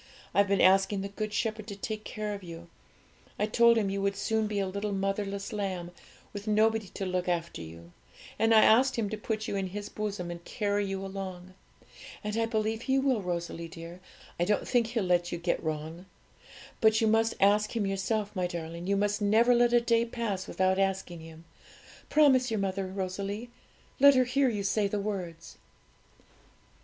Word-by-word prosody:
I've 200 Hz, +2 st, +4 dB
been 200 Hz, -1 st, +2 dB
asking 195 Hz, +1 st, +4 dB
the 200 Hz, -, -4 dB
Good 215 Hz, +1 st, -4 dB
Shepherd 215 Hz, 0 st, -2 dB
to 200 Hz, -, -6 dB
take 215 Hz, +1 st, -5 dB
care 215 Hz, -1 st, -4 dB
of 200 Hz, -, -6 dB
you; 170 Hz, -1 st, -10 dB, 0.7 s
I 210 Hz, -, +1 dB
told 235 Hz, +2 st, +4 dB
Him 200 Hz, -3 st, +1 dB
you 195 Hz, 0 st, -2 dB
would 200 Hz, 0 st, 0 dB
soon 220 Hz, +2 st, 0 dB
be 210 Hz, -1 st, -3 dB
a 195 Hz, -, +1 dB
little 200 Hz, +2 st, -3 dB
motherless 195 Hz, +1 st, -2 dB
lamb, 185 Hz, -4 st, -3 dB, 0.4 s
with 205 Hz, +1 st, -7 dB
nobody 220 Hz, 0 st, +2 dB
to 195 Hz, -, -3 dB
look 185 Hz, -1 st, -2 dB
after 170 Hz, -, -2 dB
you, 85 Hz, +1 st, -11 dB, 0.5 s
and 225 Hz, 0 st, +3 dB
I 220 Hz, -1 st, +7 dB
asked 255 Hz, +4 st, +5 dB
Him 215 Hz, -4 st, -1 dB
to -, -, -1 dB
put 215 Hz, 0 st, -3 dB
you -, -, -2 dB
in 195 Hz, -1 st, -1 dB
His 205 Hz, +2 st, -6 dB
bosom 205 Hz, -5 st, -4 dB
and 170 Hz, 0 st, -8 dB
carry 205 Hz, 0 st, -1 dB
you 195 Hz, 0 st, -4 dB
along. 185 Hz, -2 st, -7 dB, 0.7 s
And 210 Hz, 0 st, -3 dB
I 225 Hz, 0 st, +1 dB
believe 220 Hz, 0 st, -1 dB
He 265 Hz, +1 st, +1 dB
will, 265 Hz, -5 st, +2 dB
Rosalie 170 Hz, -2 st, -4 dB
dear; 165 Hz, +2 st, -10 dB, 0.4 s
I -, -, +3 dB
don't 205 Hz, +4 st, 0 dB
think 240 Hz, -3 st, +2 dB
He'll 230 Hz, -2 st, -1 dB
let 175 Hz, -1 st, +1 dB
you 175 Hz, -, -2 dB
get 170 Hz, +1 st, -1 dB
wrong. 160 Hz, +3 st, -5 dB, 0.7 s
But 220 Hz, 0 st, +4 dB
you 225 Hz, -, +2 dB
must 225 Hz, +1 st, +2 dB
ask 210 Hz, +3 st, +3 dB
Him 220 Hz, -3 st, 0 dB
yourself, 200 Hz, +2 st, -2 dB
my 180 Hz, -1 st, 0 dB
darling; 170 Hz, 0 st, -6 dB
you 200 Hz, 0 st, +2 dB
must 205 Hz, +1 st, 0 dB
never 220 Hz, +4 st, +4 dB
let 240 Hz, 0 st, +4 dB
a 240 Hz, -, +5 dB
day 235 Hz, -1 st, +2 dB
pass 230 Hz, -5 st, -3 dB
without 190 Hz, 0 st, +1 dB
asking 190 Hz, -3 st, -1 dB
Him: 160 Hz, 0 st, -12 dB, 0.6 s
promise 265 Hz, -4 st, +4 dB
your 220 Hz, -2 st, -1 dB
mother, 195 Hz, 0 st, -2 dB
Rosalie 200 Hz, +4 st, -4 dB, 0.5 s
let 280 Hz, 0 st, +8 dB
her 255 Hz, -, +5 dB
hear 260 Hz, +2 st, +2 dB
you 205 Hz, -4 st, -2 dB
say 200 Hz, +1 st, +1 dB
the 205 Hz, +1 st, -2 dB
words.' 180 Hz, -5 st, -5 dB
200 Hz, 190 wpm, -29 LUFS, 185-220 Hz, 0.7 s, let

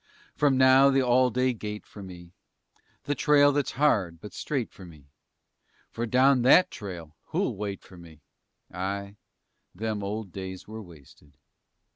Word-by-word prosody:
From 140 Hz, -2 st, +2 dB
now, 130 Hz, +1 st, +6 dB
the 135 Hz, -1 st, +2 dB
all 125 Hz, +1 st, +3 dB
day 125 Hz, +1 st, 0 dB
gait 105 Hz, -2 st, -7 dB
for 105 Hz, -, -12 dB
me, 90 Hz, -2 st, -11 dB, 0.7 s
The 145 Hz, +1 st, -1 dB
trail 145 Hz, +1 st, +4 dB
that's 145 Hz, -1 st, -1 dB
hard 100 Hz, -, +1 dB
but 105 Hz, -, -11 dB
straight 135 Hz, -6 st, -3 dB
for 95 Hz, -, -14 dB
me, 80 Hz, -6 st, -14 dB, 0.9 s
For 120 Hz, +1 st, -4 dB
down 130 Hz, +2 st, +4 dB
that 135 Hz, +9 st, +5 dB
trail, 85 Hz, -7 st, -8 dB
who'll -, -, -2 dB
wait 100 Hz, -1 st, -5 dB
for 90 Hz, -, -15 dB
me! 80 Hz, -3 st, -15 dB, 0.5 s
Ay! 100 Hz, +2 st, -4 dB, 0.6 s
them 110 Hz, +1 st, -3 dB
old 100 Hz, 0 st, -5 dB
days 95 Hz, -1 st, -8 dB
were 110 Hz, +1 st, -8 dB
wasted! 75 Hz, -, -17 dB
105 Hz, 150 wpm, -27 LUFS, 90-130 Hz, 0.9 s, now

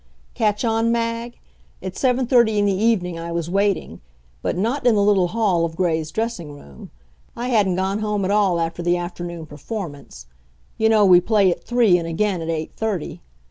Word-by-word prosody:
Catch 210 Hz, +1 st, 0 dB
on, 225 Hz, 0 st, +1 dB
Mag? 230 Hz, 0 st, -2 dB, 0.4 s
At 185 Hz, 0 st, -7 dB
seven 255 Hz, -1 st, +1 dB
thirty 235 Hz, -4 st, +3 dB
in 205 Hz, -, +2 dB
the 200 Hz, -, +2 dB
evening 190 Hz, -5 st, 0 dB
I 170 Hz, 0 st, -6 dB
was 170 Hz, 0 st, -3 dB
waiting; 200 Hz, -, -1 dB, 0.4 s
but -, -, -2 dB
not 240 Hz, +8 st, 0 dB
in 235 Hz, -, +5 dB
the 205 Hz, -, +3 dB
little 200 Hz, -3 st, +3 dB
hall 195 Hz, -4 st, +1 dB
of 165 Hz, -1 st, -3 dB
Gray's 160 Hz, -3 st, 0 dB
dressing 185 Hz, -6 st, -4 dB
room. 70 Hz, -, -13 dB, 0.5 s
I 245 Hz, +2 st, -4 dB
hadn't 205 Hz, -6 st, +2 dB
gone 190 Hz, +2 st, -1 dB
home 210 Hz, -2 st, -1 dB
at 190 Hz, -, 0 dB
all 200 Hz, -4 st, +2 dB
after 165 Hz, +1 st, -2 dB
the 175 Hz, +1 st, +1 dB
afternoon 175 Hz, -1 st, -6 dB
performance 145 Hz, -, -8 dB, 0.5 s
you 220 Hz, 0 st, +2 dB
know 215 Hz, -2 st, +5 dB
we 180 Hz, -2 st, +7 dB
play 200 Hz, -2 st, +3 dB
at -, -, -5 dB
three, 230 Hz, -7 st, +3 dB
and 165 Hz, -, -5 dB
again 180 Hz, +2 st, -1 dB
at 165 Hz, -, -5 dB
eight 160 Hz, -1 st, -3 dB
thirty. 210 Hz, -7 st, -3 dB
195 Hz, 190 wpm, -21 LUFS, 170-220 Hz, 0.5 s, we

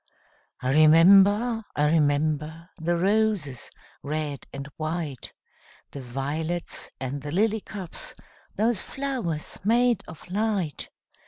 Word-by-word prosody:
I 130 Hz, -, +1 dB
remember, 195 Hz, -, +6 dB
I 150 Hz, +1 st, +2 dB
remember, 155 Hz, +2 st, 0 dB
The 170 Hz, +1 st, 0 dB
roses, 195 Hz, -, 0 dB, 0.3 s
red 150 Hz, -1 st, -4 dB
and 140 Hz, 0 st, -7 dB
white, 155 Hz, -4 st, -4 dB, 0.6 s
The 140 Hz, -, -7 dB
violets, 145 Hz, +7 st, -3 dB
and 135 Hz, +2 st, -4 dB
the 145 Hz, +1 st, -6 dB
lily 215 Hz, +5 st, +1 dB
cups, 190 Hz, -5 st, -6 dB, 0.4 s
Those 220 Hz, -1 st, +1 dB
flowers 250 Hz, -, -4 dB
made 235 Hz, 0 st, +3 dB
of 160 Hz, 0 st, -11 dB
light! 200 Hz, -7 st, -1 dB
165 Hz, 105 wpm, -26 LUFS, 150-205 Hz, 0.6 s, remember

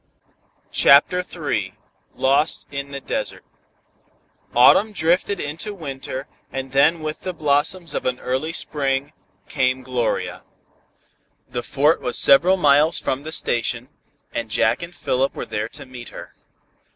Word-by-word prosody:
CHAPTER 145 Hz, +6 st, +5 dB
III 130 Hz, -, -3 dB, 0.4 s
LOST 140 Hz, +4 st, +1 dB
IN 140 Hz, 0 st, -5 dB
THE 140 Hz, 0 st, -6 dB
DESERT -, -, -4 dB, 1.1 s
Autumn 195 Hz, -, +6 dB
drifted 180 Hz, +2 st, +1 dB
into 165 Hz, +9 st, -4 dB
winter, 135 Hz, -4 st, -6 dB, 0.2 s
and 135 Hz, 0 st, -5 dB
then 150 Hz, +5 st, +3 dB
with 155 Hz, 0 st, -5 dB
the 185 Hz, -, -4 dB
blossoms 155 Hz, +3 st, 0 dB
of -, -, -2 dB
an 125 Hz, 0 st, -1 dB
early 130 Hz, +6 st, -2 dB
spring, 140 Hz, -3 st, -2 dB, 0.3 s
came 130 Hz, -1 st, 0 dB
Gloria. 125 Hz, -2 st, -2 dB, 1.1 s
The 120 Hz, -, -4 dB
Fort 145 Hz, +6 st, +2 dB
was 125 Hz, -, -1 dB
several 175 Hz, +8 st, +6 dB
miles 150 Hz, 0 st, +4 dB
from 130 Hz, -, -2 dB
the 155 Hz, +2 st, -7 dB
station, 120 Hz, -3 st, -1 dB, 0.4 s
and 115 Hz, -1 st, -3 dB
Jack 105 Hz, -, +1 dB
and 170 Hz, +1 st, -8 dB
Philip 135 Hz, -4 st, -1 dB
were -, -, -5 dB
there 105 Hz, +1 st, -3 dB
to -, -, -8 dB
meet 125 Hz, -2 st, -10 dB
her. -, -, -11 dB
140 Hz, 135 wpm, -21 LUFS, 130-160 Hz, 1.1 s, Autumn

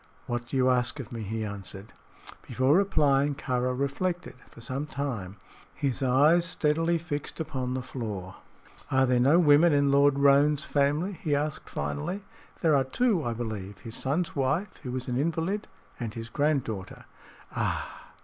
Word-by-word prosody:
"What 120 Hz, 0 st, -3 dB
do 135 Hz, -, -2 dB
you 130 Hz, 0 st, +4 dB
ask 125 Hz, +3 st, 0 dB
of 125 Hz, -, -7 dB
me?" 115 Hz, -2 st, -5 dB
he 110 Hz, +1 st, -3 dB
answered. 100 Hz, 0 st, -8 dB, 0.5 s
Before 130 Hz, +4 st, +3 dB
replying, 145 Hz, -7 st, +3 dB
Kāra 125 Hz, -1 st, -1 dB
reflected 170 Hz, +6 st, -2 dB, 0.2 s
for -, -, -15 dB
some 130 Hz, +5 st, -4 dB
time, 115 Hz, -10 st, -4 dB, 0.4 s
his 140 Hz, -2 st, -1 dB
eyes 145 Hz, +7 st, +4 dB
steadily 165 Hz, 0 st, +1 dB
fixed 155 Hz, -2 st, -5 dB
upon 130 Hz, -5 st, -3 dB
the 130 Hz, -, -3 dB
floor. 100 Hz, -8 st, -6 dB, 0.5 s
"Are 130 Hz, 0 st, +3 dB
there 125 Hz, -1 st, +2 dB
no 140 Hz, +7 st, +5 dB
women 160 Hz, 0 st, +6 dB
in 140 Hz, -1 st, +3 dB
Lord 140 Hz, 0 st, +4 dB
Roane's 140 Hz, +1 st, +4 dB
family?" 145 Hz, +7 st, +1 dB
he 155 Hz, -4 st, -1 dB
asked, 145 Hz, -2 st, -3 dB
finally. 75 Hz, -, -3 dB, 0.4 s
"There 160 Hz, -3 st, +4 dB
are 135 Hz, -, +4 dB
two, 185 Hz, -, +1 dB
I 120 Hz, -, -1 dB
believe 105 Hz, -4 st, -5 dB
his 115 Hz, +2 st, -8 dB
son's 155 Hz, +6 st, -1 dB
wife, 155 Hz, +8 st, 0 dB
who 125 Hz, -1 st, -5 dB
is 130 Hz, -1 st, -4 dB
an 125 Hz, -1 st, -1 dB
invalid, 165 Hz, +8 st, -1 dB, 0.3 s
and 115 Hz, -4 st, -4 dB
his 115 Hz, 0 st, -6 dB
granddaughter." 130 Hz, -9 st, -1 dB, 0.5 s
"Ah!" -, -, -3 dB
135 Hz, 160 wpm, -28 LUFS, 120-150 Hz, 0.5 s, women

